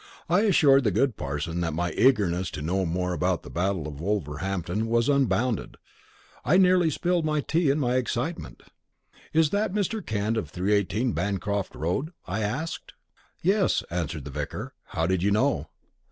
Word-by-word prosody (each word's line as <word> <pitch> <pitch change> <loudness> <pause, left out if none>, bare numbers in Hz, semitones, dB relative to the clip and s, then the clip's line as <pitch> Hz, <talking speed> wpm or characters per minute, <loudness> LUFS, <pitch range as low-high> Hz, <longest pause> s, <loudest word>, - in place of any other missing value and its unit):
I 175 +3 +3
assured 150 -10 +5
the 110 - +3
good 125 +4 +1
parson 75 +4 -3
that 80 -3 -1
my 85 +1 -1
eagerness 95 -7 +2
to 75 - -5
know 90 +3 0
more 90 +2 -1
about 90 0 0
the - - -10
Battle 90 -3 -1
of 75 -2 -8
Wolverhampton 95 +2 -2
was 115 +1 +2
unbounded. 130 -5 +1 0.7
I 185 - +4
nearly 180 -3 +5
spilled 175 +3 0
my 150 -1 +1
tea 160 +1 +1
in 140 - +2
my 125 -3 +1
excitement. 125 - -3 0.7
"Is 160 -2 +3
that 205 -1 0
Mr. 210 +1 -1
Kent 110 +1 -1
of 85 -10 -3
318, 100 +7 0
Bancroft 100 +1 -2
Road?" 110 - -2
I 95 +5 -3
asked. 130 +11 -3 0.5
"Yes," 195 +2 +2
answered 80 -4 -3
the 70 - -6
vicar. 75 +1 -5
"How 80 - -2
did 95 0 +1
you 100 - +2
know?" 105 - +1
105 Hz, 165 wpm, -26 LUFS, 85-140 Hz, 0.7 s, assured